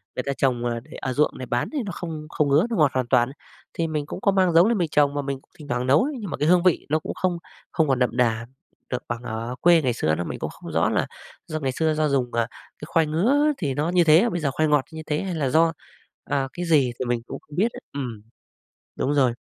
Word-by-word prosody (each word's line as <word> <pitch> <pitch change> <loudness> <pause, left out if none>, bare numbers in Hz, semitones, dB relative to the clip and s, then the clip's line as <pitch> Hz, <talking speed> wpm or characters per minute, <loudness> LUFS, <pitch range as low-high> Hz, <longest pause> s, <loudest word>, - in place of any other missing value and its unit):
người 125 - -2
ta 140 - -2
trồng 125 -3 +1
ờ 120 -1 -1
để 145 +6 -19
ở 130 - -2
ruộng 150 +3 +1
này 130 - -5
bán 120 0 -1
thì 290 - -1
nó 195 - -4
không 160 -3 -6
không 150 - +1
ngứa, 150 +9 +4
nó 235 - -1
ngọt 150 -4 +4
hoàn 130 -2 0
toàn 120 -1 +3
ấy. - - -10 0.4
Thì 165 -1 -1
mình 150 -2 -2
cũng 170 - -7
có 200 - +3
mang 185 -3 +2
giống 170 +5 +6
lên 230 -2 +2
mình 170 -4 0
trồng 145 -1 +3
và 145 - -1
mình 140 -1 -4
cũng - - -34
thỉnh 150 -2 -11
thoảng 125 -1 -1
nấu 140 - +5
ấy, 295 +2 -2
nhưng 205 -5 -5
mà - - -4
cái 150 - 0
hương 180 +1 +5
vị 180 -3 +2
nó 155 +2 +2
cũng - - -5
không 180 -2 0 0.3
không 160 -3 +2
còn 130 -2 +1
đậm 125 -1 0
đà 115 -2 +1 0.4
được 125 - -3
bằng 120 0 -4
ở 115 +2 -4
quê 170 -2 +6
ngày 125 -3 +1
xưa 80 -8 0
nữa. 85 - -2
Mình - - -6
cũng - - -3
không - - -10
rõ - - +2
là - - 0 0.4
do 155 0 -3
ngày 135 -2 -1
xưa 160 +3 +1
do 155 0 +1
dùng, 130 -3 0
ờ, 115 -1 +1 0.3
cái 150 - -7
khoai 165 -2 +2
ngứa 265 - +3
thì 140 -6 -1
nó 150 +5 -1
như 175 0 +4
thế, 165 +9 +5
bây 175 - -2
giờ 145 -4 0
khoai 155 +3 +1
ngọt 150 -3 +3
như 160 0 -7
thế 150 0 0
hay 185 -3 -3
là 140 -4 0
do, 165 +3 +3 0.5
à, 135 -2 -1
cái 175 0 -4
gì 145 -7 +3
thì 130 - -1
mình 120 -1 0
cũng - - -6
không 150 - -14
biết 220 +7 +2
nữa. - - -8
Ừm, 125 -7 -5 0.8
đúng 145 - 0
rồi. 130 -4 +3
150 Hz, 285 wpm, -24 LUFS, 125-165 Hz, 0.8 s, giống